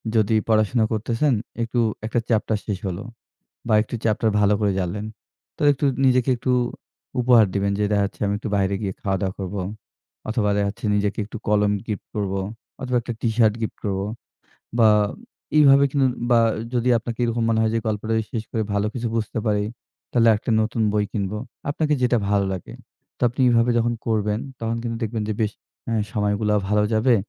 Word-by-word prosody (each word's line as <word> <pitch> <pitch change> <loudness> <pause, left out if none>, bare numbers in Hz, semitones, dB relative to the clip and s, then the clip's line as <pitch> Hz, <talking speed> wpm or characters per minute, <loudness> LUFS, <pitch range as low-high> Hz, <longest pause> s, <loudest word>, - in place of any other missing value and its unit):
যদি 110 0 +3
পড়াশোনা 110 +1 +3
করতেছেন 115 +6 +1 0.3
একটু 115 +1 -1 0.3
একটা 115 +2 0
চ্যাপ্টার 110 -1 +1
শেষ 105 -3 -2
হল। 90 -2 -3 0.7
বা 110 - +4
একটু 110 - -8
চ্যাপ্টার 110 0 +2
ভালো 105 0 +4
করে 105 -2 +2
জানলেন। 100 +4 -3 0.5
তো - - -5
একটু 140 +1 -3 0.2
নিজেকে 130 -1 +3
একটু 125 +2 -1 0.7
উপহার 120 -3 +6
দিবেন, 100 0 +1
যে 105 - +1
দেখাচ্ছে 100 -1 0
আমি 100 - 0
একটু 110 - -5
বাইরে 100 0 +1
গিয়ে 95 -2 -2
খাওয়া 95 -1 0
দাওয়া 95 -1 -1
করব। 95 0 -5 0.7
অথবা 110 -2 +1
দেখাচ্ছে 100 +3 -2
নিজেকে 105 0 0
একটু 110 - -8
কলম 105 -1 +3
গিফট 105 -3 -4
করব। 100 -2 -1 0.5
অথবা 125 -1 -1
একটা 120 - -4
টিশার্ট 110 -2 +3
গিফট 110 - -3
করব। 95 -2 -1 0.8
বা 110 -2 +7 0.7
এইভাবে 140 -2 +7
কিন 140 - +1 0.3
বা 120 - +6 0.3
যদি 125 0 +1
আপনাকে 115 +1 -6
এরকম 115 0 0
মনে 110 -1 +2
হয় 110 0 +2
যে - - +2
গল্পটা 110 +1 -1 0.2
শেষ 110 -3 -2
করে 110 - 0
ভালো 100 +1 +1
কিছু 120 -2 -2
বুঝতে 110 0 -2
পারি 105 -1 +1 0.5
তাহলে 115 -2 +4
একটা 110 - -3
নতুন 110 +1 -1
বই 105 -1 +2
কিনব। 100 -2 -2 0.4
আপনাকে 150 +1 0
যেটা 125 -1 +3
ভালো 100 -1 +2
লাগে। 95 - -7 0.4
তো - - -26
আপনি 125 +3 -3
এভাবে 120 0 +3
যখন 120 0 +1
করবেন 105 -1 +1 0.2
তখন 115 0 -1
কিন্তু 115 -1 -3
দেখবেন 110 0 -2
যে - - 0
বেশ 110 -1 +1 0.4
আ - - 0 0.2
সময়গুলা 105 -1 +1
ভালো 105 0 +3
যাবে। 115 +3 +4
110 Hz, 180 wpm, -23 LUFS, 105-120 Hz, 0.8 s, বা